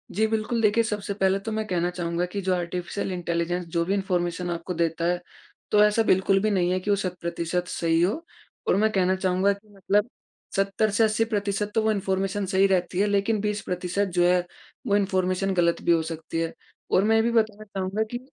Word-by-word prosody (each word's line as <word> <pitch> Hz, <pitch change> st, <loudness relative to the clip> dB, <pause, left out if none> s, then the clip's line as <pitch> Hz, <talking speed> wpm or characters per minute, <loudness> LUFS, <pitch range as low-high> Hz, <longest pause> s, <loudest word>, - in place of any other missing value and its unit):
जी 220 Hz, +3 st, +3 dB
बिल्कुल, 225 Hz, +2 st, -1 dB
देखिए 220 Hz, +2 st, +3 dB
सबसे 205 Hz, -2 st, -3 dB
पहले 195 Hz, -1 st, +1 dB
तो 225 Hz, -, -2 dB
मैं 220 Hz, 0 st, -2 dB
कहना 175 Hz, -2 st, 0 dB
चाहूँगा 175 Hz, 0 st, -2 dB
कि 200 Hz, +3 st, -5 dB
जो 190 Hz, 0 st, +1 dB
आर्टिफिशियल 180 Hz, +2 st, -3 dB
इंटेलिजेंस 175 Hz, 0 st, -2 dB
जो 170 Hz, -, +3 dB
भी 195 Hz, -, 0 dB
इनफार्मेशन 180 Hz, -2 st, -1 dB
आपको 170 Hz, +1 st, -3 dB
देता 165 Hz, 0 st, -1 dB
है 175 Hz, +1 st, +1 dB, 0.5 s
तो 210 Hz, 0 st, +6 dB
ऐसा 210 Hz, +2 st, +3 dB
बिल्कुल 195 Hz, -1 st, +3 dB
भी 215 Hz, +1 st, +1 dB
नहीं 180 Hz, -2 st, +2 dB
है 185 Hz, -, +1 dB
कि 185 Hz, -, -5 dB
वो 205 Hz, -, +5 dB
सत 185 Hz, -2 st, -3 dB
प्रतिशत 170 Hz, +1 st, -2 dB
सही 165 Hz, -2 st, +1 dB
हो। 215 Hz, -, 0 dB, 0.4 s
और -, -, +4 dB
मैं 215 Hz, +2 st, +3 dB
कहना 185 Hz, -2 st, +2 dB
चाहूँगा 190 Hz, +1 st, +2 dB
कि 200 Hz, +2 st, -16 dB
मतलब 205 Hz, +3 st, 0 dB, 0.5 s
70 195 Hz, +2 st, +1 dB
से 210 Hz, +3 st, +3 dB
80% 210 Hz, -2 st, 0 dB
तो 225 Hz, -, +4 dB
वो 220 Hz, -, +3 dB
इनफार्मेशन 195 Hz, 0 st, -1 dB
सही 190 Hz, +1 st, +3 dB
रहती 180 Hz, -1 st, 0 dB
है 205 Hz, -, +3 dB
लेकिन 205 Hz, +2 st, +1 dB
20% 200 Hz, -2 st, -1 dB
जो 175 Hz, -, +5 dB
है 180 Hz, 0 st, +4 dB, 0.5 s
वो 200 Hz, -, +3 dB
इनफार्मेशन 190 Hz, -1 st, +1 dB
गलत 170 Hz, -2 st, +2 dB
भी -, -, +2 dB
हो 165 Hz, -1 st, +4 dB
सकती 165 Hz, 0 st, -5 dB
है। 165 Hz, 0 st, -2 dB, 0.4 s
और 190 Hz, -, +4 dB
मैं 220 Hz, +2 st, +3 dB
ये 225 Hz, -, +5 dB
भी 235 Hz, -, +1 dB
बताना 215 Hz, -2 st, +1 dB
चाहूँगा 195 Hz, +1 st, -2 dB
कि 240 Hz, -, -3 dB
195 Hz, 210 wpm, -25 LUFS, 180-210 Hz, 0.5 s, तो